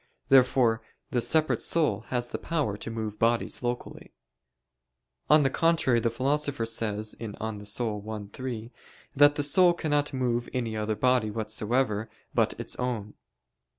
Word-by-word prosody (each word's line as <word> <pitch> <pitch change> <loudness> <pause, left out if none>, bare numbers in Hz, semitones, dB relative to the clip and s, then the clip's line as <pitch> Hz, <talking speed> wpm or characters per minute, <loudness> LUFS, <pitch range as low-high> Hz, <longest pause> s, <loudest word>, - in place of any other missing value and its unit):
Therefore, 125 -3 +4 0.3
the 120 - +1
separate 155 +5 +2
soul 115 -10 +2
has 120 -1 -1
the - - -4
power 150 -11 -1
to 105 - -6
move 110 -2 -5
bodies 115 +1 +1
locally. 120 0 -5 1.1
On 150 0 +6
the 135 - +3
contrary, 165 -8 +2
the 115 - 0
Philosopher 140 +1 0
says 110 -1 -1
(De 110 -3 -6
Anima 110 -2 -5
i, 105 -1 -3
3) 120 -3 -6 0.4
that 145 +1 +6
the 145 - -1
soul 175 +5 +5
cannot 145 -3 0
move 120 -3 -1
any 120 -4 -2
other 110 0 -1
body 125 0 +2
whatsoever 110 +1 -1 0.2
but - - +1
its - - -3
own. 115 -5 -3
120 Hz, 145 wpm, -27 LUFS, 110-135 Hz, 1.1 s, On